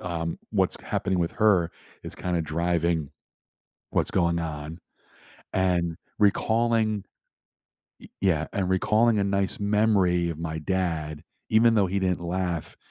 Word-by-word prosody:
Um, 85 -2 -3
what's - - +1
k - - -16
happening 95 -2 -1
with 85 -1 0
her 95 -6 +3 0.3
is - - -7
kinda 90 -2 -1
driving 85 -1 0 0.8
what's - - +1
going 85 -2 +2
on 80 0 -5 0.7
and 90 -3 +1 0.2
recalling 110 0 +2 1.0
Ye - - -14
yeah, 80 -5 +1
and 95 -2 -1
recalling 110 +4 +3
a - - +1
nice 100 0 0
memory 100 -5 +2
of 80 - -6
my 80 -1 -3
dad, 80 -3 -2 0.3
even 115 +1 +5
though 100 -2 +4
he 95 +2 -1
didn't 90 -2 0
laugh 85 -2 -3
90 Hz, 135 wpm, -26 LUFS, 85-100 Hz, 1.0 s, even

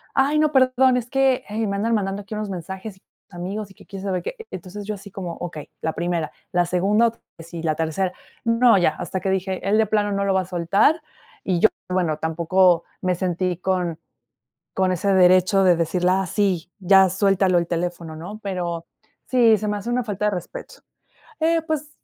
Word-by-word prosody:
Ay, 285 +3 +3
no, 305 -1 +3
perdón, 260 -1 +4
es 240 -1 -3
que, 270 -1 +2
eh, 220 +1 -1
me 200 - -2
andan 225 +4 0
mandando 200 -1 -1
aquí 200 - -9
unos 210 -1 -3
mensajes, 190 +2 -7 0.3
amigos 195 +3 -5
y - - -16
que - - -17
quién 195 -1 -8
sabe 185 -3 -2
qué". - - -5
Entonces, 190 +3 -8
yo 215 - -2
así 200 0 -12
como, 180 -3 -5
okey, 165 -4 -7
la 160 - -1
primera, 170 -1 -2 0.2
la 175 -1 +2
segunda, 200 +6 +2 0.3
sí, 165 0 -8
la 155 -2 0
tercera, 165 +4 -1 0.3
no, 230 0 +4
ya, 175 - +4
hasta 190 - -4
que 190 - -2
dije: 190 0 -2
"El 205 +2 +3
de 220 - +4
plano 210 -1 0
no 200 0 0
lo 195 - +2
va 190 - +2
a - - -7
soltar," 185 - +2 0.4
y 180 -3 0
yo, 220 - +6 0.2
bueno, 175 -4 0
tampoco 170 +2 +2 0.2
me 185 0 +1
sentí 180 0 -1
con 180 -3 -1 0.8
con 190 -1 +2
ese 195 +2 +1
derecho 185 +1 +5
de 180 -2 +5
decirle: 175 +2 +1
"Ah, 190 +1 +1
sí, 185 -3 0
ya 190 0 +5
suéltalo, 190 -1 +2
el 170 -1 0
teléfono, 170 -2 -3
¿no?" 190 +7 -8
Pero 175 -4 -3 0.4
sí, 235 -4 +5
se 210 - -4
me 210 - -1
hace 205 +4 -6
una 245 +1 0
falta 210 -1 -2
de 210 - +2
respeto, 180 -3 -7 0.6
eh, 330 +1 +2
pues 310 -2 -3
190 Hz, 200 wpm, -22 LUFS, 175-210 Hz, 0.8 s, yo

